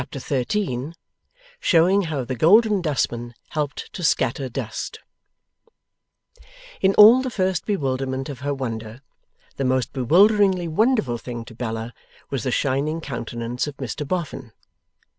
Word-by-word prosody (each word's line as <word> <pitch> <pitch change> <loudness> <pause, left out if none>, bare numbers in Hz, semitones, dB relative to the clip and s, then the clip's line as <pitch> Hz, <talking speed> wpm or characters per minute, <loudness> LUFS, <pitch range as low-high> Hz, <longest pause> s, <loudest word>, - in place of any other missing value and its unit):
Chapter 140 - -7
13 135 +1 -2 0.6
SHOWING 185 - +4
HOW 145 -4 -2
THE 130 - -3
GOLDEN 205 - +5
DUSTMAN 120 -6 -2
HELPED 150 -2 -4
TO - - -6
SCATTER 135 -3 +1
DUST 120 - -5 1.8
In 195 0 +3
all 225 +5 +9
the 260 - -2
first 190 -5 -1
bewilderment 135 -8 -2
of 140 -4 -7
her 140 +2 -2
wonder, 115 -3 -5 0.6
the 135 - -1
most 130 -1 0
bewilderingly 185 - +4
wonderful 165 - +1
thing 120 -1 -7
to - - -12
Bella 115 0 -5 0.4
was 135 -3 -1
the 130 - 0
shining 140 +5 0
countenance 120 -2 -4
of 145 - -7
Mr 135 +2 -5
Boffin. 145 -8 -4
140 Hz, 130 wpm, -23 LUFS, 125-180 Hz, 1.8 s, all